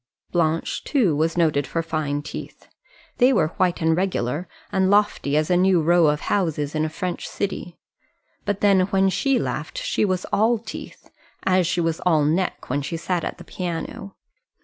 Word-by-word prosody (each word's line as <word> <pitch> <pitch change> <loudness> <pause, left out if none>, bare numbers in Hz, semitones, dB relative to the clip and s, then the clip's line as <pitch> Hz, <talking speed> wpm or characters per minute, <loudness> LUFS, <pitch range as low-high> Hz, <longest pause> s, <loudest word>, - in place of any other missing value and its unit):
Blanche, 165 -2 0
too, 225 - +2
was 160 +3 0
noted 150 -5 +2
for 165 +6 -2
fine 150 -3 -2
teeth. 150 - -8 0.5
They 250 +1 +6
were 165 -11 +2
white 180 -2 +1
and 160 0 +3
regular 175 -3 -1 0.2
and 190 -1 +2
lofty 200 -8 +2
as 155 +3 +1
a - - +5
new 185 0 +4
row 170 +1 +4
of 150 0 +1
houses 155 -7 -1
in 155 0 0
a 155 - -1
French 175 +2 -4
city. 185 -3 -4 0.7
But 205 0 -2
then 200 -2 +5
when 195 -1 +2
she 270 +7 +1
laughed - - -3
she - - 0
was 185 -3 0
all 225 +3 +3
teeth; 220 0 -10 0.3
as 185 -2 +3
she 175 - 0
was 165 -1 -1
all 160 -5 +2
neck 170 +5 -1
when 140 +3 -1
she 165 +4 -4
sat 175 +1 -2
at - - -4
the - - -11
piano. 180 +2 -5
175 Hz, 180 wpm, -23 LUFS, 155-190 Hz, 0.7 s, They